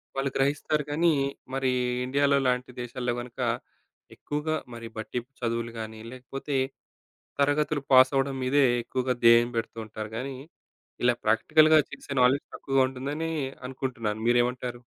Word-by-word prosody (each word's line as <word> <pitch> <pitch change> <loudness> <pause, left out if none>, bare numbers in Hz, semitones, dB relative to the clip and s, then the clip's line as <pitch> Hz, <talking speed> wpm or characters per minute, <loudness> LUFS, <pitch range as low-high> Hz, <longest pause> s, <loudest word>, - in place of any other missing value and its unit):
వాళ్ళు 135 0 0
గ్రహిస్తారు 145 +2 +1
కానీ, 165 +2 +3 0.4
మరి 135 -1 +1 0.3
ఇండియాలో 140 +1 +3
లాంటి 125 0 0
దేశాల్లో 120 0 -3
గనక. 120 -1 -12 0.8
ఎక్కువగా 150 +2 -2 0.2
మరి 115 -1 -7
బట్టి 110 +3 -3 0.2
చదువులు 115 0 -2
గానీ, 110 0 -6
లేకపోతే 135 +2 -4 0.8
తరగతులు 145 0 +1
పాసవ్వడం 135 +1 +5
మీదే 135 +2 +3 0.2
ఎక్కువగా 125 +1 -1
ధ్యేయం 115 +1 +7
పెడుతూంటరు 110 -1 -5
గానీ, 130 +2 -4 0.7
ఇలా 125 -1 +5
ప్రాక్టికల్‌గా 155 +8 +5
చేసే 140 - -8
నాలెడ్జ్ 130 +3 +3
తక్కువగా 135 -1 +1
ఉంటుందని 145 +5 -4 0.4
అనుకుంటున్నాను. 120 -5 -3
మీరేమంటారు? 120 0 +1
130 Hz, 115 wpm, -27 LUFS, 120-140 Hz, 0.8 s, ధ్యేయం